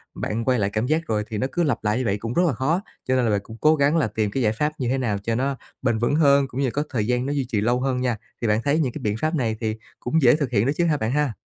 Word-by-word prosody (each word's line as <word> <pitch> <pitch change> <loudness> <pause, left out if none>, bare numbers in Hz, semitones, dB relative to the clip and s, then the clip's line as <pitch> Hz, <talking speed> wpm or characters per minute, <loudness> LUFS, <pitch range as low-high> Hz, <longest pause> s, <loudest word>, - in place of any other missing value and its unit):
bạn 115 +2 -3
quay 125 -2 +2
lại 100 -1 +1
cảm 110 +3 -1
giác 160 +3 0
rồi 105 -1 0
thì 110 - -4
nó 130 - 0
cứ 175 - 0
lặp 145 -7 0
lại 105 +1 +1
như 130 - -1
vậy 100 -2 +1
cũng 115 +3 -5
rất 175 - +3
là 150 - +1
khó. 150 - 0 0.3
Cho 130 - +2
nên 125 -1 +2
là 110 - +2
bạn 100 - +2
cũng 110 +2 -11
cố 155 +1 +5
gắng 145 +2 +2
là 150 - +2
tìm 105 -1 -1
cái 130 +4 -1
giải 110 -1 +2
pháp 150 +6 -1
như 130 - -1
thế 135 - +1
nào 115 -6 -1
cho 115 +1 -1
nó 135 +2 -1 0.2
bền 120 -4 +1
vững 120 +5 +1
hơn 140 -3 +4
cũng 130 +1 -4
như 135 - +2
là - - -2
có 145 - -1
thời 110 -5 -1
gian 125 +1 0
nó 140 - -1
duy 140 -2 -1
trì 105 -5 0
lâu 120 +3 +1
hơn 130 -1 0
nha. 125 -3 0 0.2
Thì 115 - 0
bạn 105 +1 +2
thấy 145 +2 +2
những 130 -7 0
cái - - -6
biện 105 0 -1
pháp 155 +2 0
này 115 -7 0
thì 110 -1 -2 0.2
cũng 160 +6 0
dễ 120 -1 +6
thực 145 -4 -2
hiện 105 -2 +2
đó 135 - +2
chứ 175 - +2
ha 155 -3 +2
bạn 110 -3 -1
ha? 145 -3 +1
125 Hz, 350 wpm, -23 LUFS, 110-140 Hz, 0.3 s, dễ